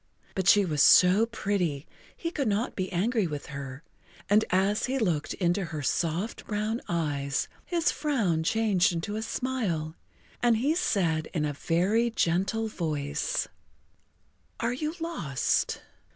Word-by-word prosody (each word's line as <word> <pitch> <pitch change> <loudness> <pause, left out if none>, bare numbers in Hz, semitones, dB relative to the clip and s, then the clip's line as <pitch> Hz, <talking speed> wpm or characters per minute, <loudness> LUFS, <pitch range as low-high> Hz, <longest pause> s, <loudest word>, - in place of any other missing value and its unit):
But 190 -2 -2
she 205 -1 +6
was 150 -5 0
so 185 +9 +6
pretty 185 -10 -1 0.3
he 335 - -3
could 280 -7 -1
not 215 +3 0
be 185 -1 -3
angry 205 +3 +1
with 150 -2 -5
her, 135 +1 -7 0.5
and 210 +1 +6
as 195 +5 +1
he 265 +2 -1
looked 170 - 0
into 180 +1 0
her 155 -3 -5
soft 170 +9 -1
brown 215 +2 -1
eyes 145 -5 -1 0.2
his 340 -2 +1
frown 220 - 0
changed 205 0 +2
into 170 +5 -3
a 220 - -2
smile, 220 -11 -2 0.5
and 240 -2 +4
he 275 +7 +2
said 165 - 0
in 155 -2 +1
a 145 - -2
very 190 +11 +1
gentle 195 +2 0
voice: 160 - -2 1.1
"Are 230 +1 0
you 305 +5 -3
lost? 240 - -1
190 Hz, 140 wpm, -28 LUFS, 160-230 Hz, 1.1 s, she